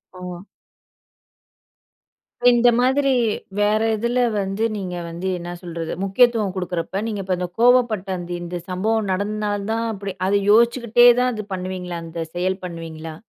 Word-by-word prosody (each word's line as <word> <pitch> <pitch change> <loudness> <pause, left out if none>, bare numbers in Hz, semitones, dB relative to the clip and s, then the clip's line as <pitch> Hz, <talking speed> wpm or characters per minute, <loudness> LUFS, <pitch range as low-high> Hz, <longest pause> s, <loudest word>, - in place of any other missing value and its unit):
ஓ! 180 - -11 2.3
இந்த 240 0 +5
மாதிரி 270 +2 +3 0.5
வேற 210 +1 +3 0.2
எதில 235 +3 +1 0.2
வந்து 195 +2 -2
நீங்க 185 -3 -4
வந்து 170 +3 -5
என்னா 175 0 -6
சொல்றது 170 -2 -5
முக்கியத்துவம் 215 0 +3
குடுக்குறப்ப, 180 +1 -3
நீங்க 210 -3 -3
இப்ப 185 -1 0
அந்த 180 0 -2
கோவப்பட்ட 240 -5 +4
அந்த 175 0 -7
இந்த 175 +1 -5
சம்பவம் 210 +3 0
நடந்தனால 205 +1 -2
தான் 230 +1 -1
அப்படி 200 -1 -5
அத 200 +1 +2
யோசிச்சுக்கிட்டே 235 +1 +5
தான் 250 0 +2
அது 215 -2 -5
பண்ணுவீங்களா? 180 -1 -4
அந்த 165 +1 -7 0.2
செயல் 185 +2 -1
பண்ணுவீங்களா? 165 -2 -7
195 Hz, 135 wpm, -21 LUFS, 180-225 Hz, 2.3 s, இந்த